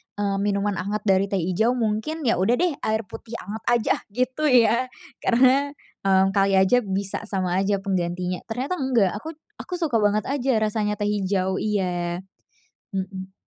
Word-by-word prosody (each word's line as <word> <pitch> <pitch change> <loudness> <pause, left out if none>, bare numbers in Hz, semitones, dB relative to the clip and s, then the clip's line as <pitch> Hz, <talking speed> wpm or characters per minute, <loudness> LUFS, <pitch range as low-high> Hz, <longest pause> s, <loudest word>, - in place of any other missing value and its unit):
eee, 200 -1 -1
minuman 200 0 0
anget 205 +3 -2
dari 190 0 +4
teh 195 -2 -1
hijau. 205 +8 +1
Mungkin, 235 +7 -1
ya 235 -5 +2
udah 195 +6 +2
deh, 350 +6 +2
air 220 0 +1
putih 230 - -10
anget 210 +3 -7
aja, 240 -2 +3 0.2
gitu 255 +6 -1
ya. 240 -3 +4 0.4
Karena, 265 +4 +4 0.3
eee, 190 -1 +5
kali 195 0 +2
aja 190 +5 +5
bisa 195 +2 -3
sama 185 -4 -1
aja 195 0 +1
penggantinya, 180 -2 -2
ternyata 255 +10 -3
enggak, 250 - +2
aku 315 +10 -7 0.3
aku 365 - -7
suka 320 -9 0
banget 210 0 +2
aja 265 -4 +1
rasanya 215 -1 0
teh 205 0 -1
hijau. 190 -2 0
Iya. 180 -4 -1 0.7
Mhm. 190 0 -5
205 Hz, 160 wpm, -24 LUFS, 190-240 Hz, 0.7 s, eee